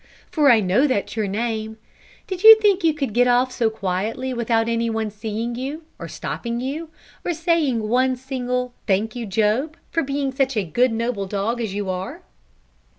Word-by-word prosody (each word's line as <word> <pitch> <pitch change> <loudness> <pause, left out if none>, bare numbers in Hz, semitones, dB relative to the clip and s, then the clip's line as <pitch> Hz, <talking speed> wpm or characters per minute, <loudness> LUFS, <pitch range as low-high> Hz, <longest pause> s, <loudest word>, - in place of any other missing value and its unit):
for 295 -3 +4
I 230 -3 +6
know 205 +10 +3
that's 235 -7 -1
your 215 -2 -1
name 220 +1 -3 0.5
did 375 -4 -5
you 445 +1 +10
think 400 -3 +3
you 325 - +5
could 275 -8 -3
get 245 +2 +4
off 250 +1 +3
so 230 -3 +1
quietly 220 +5 -3
without 230 -1 +1
any 230 0 0
one 220 -1 -2
seeing 220 +3 -4
you, 275 +6 -5 0.2
or - - -6
stopping 235 0 -4
you, 295 +6 -4 0.3
or 350 - -1
saying 305 -9 +1
one 255 +3 +2
single 250 -1 -3
'thank 210 +3 +1
you, 235 -2 -4
Job,' 225 - 0
for 330 - +1
being 275 -1 -2
such 265 -1 0
a 210 - +2
good 245 +9 +1
noble 225 -3 -2
dog 210 +5 -2
as 210 -4 -3
you 205 -1 -3
are? 185 0 -5
240 Hz, 185 wpm, -22 LUFS, 220-270 Hz, 0.5 s, you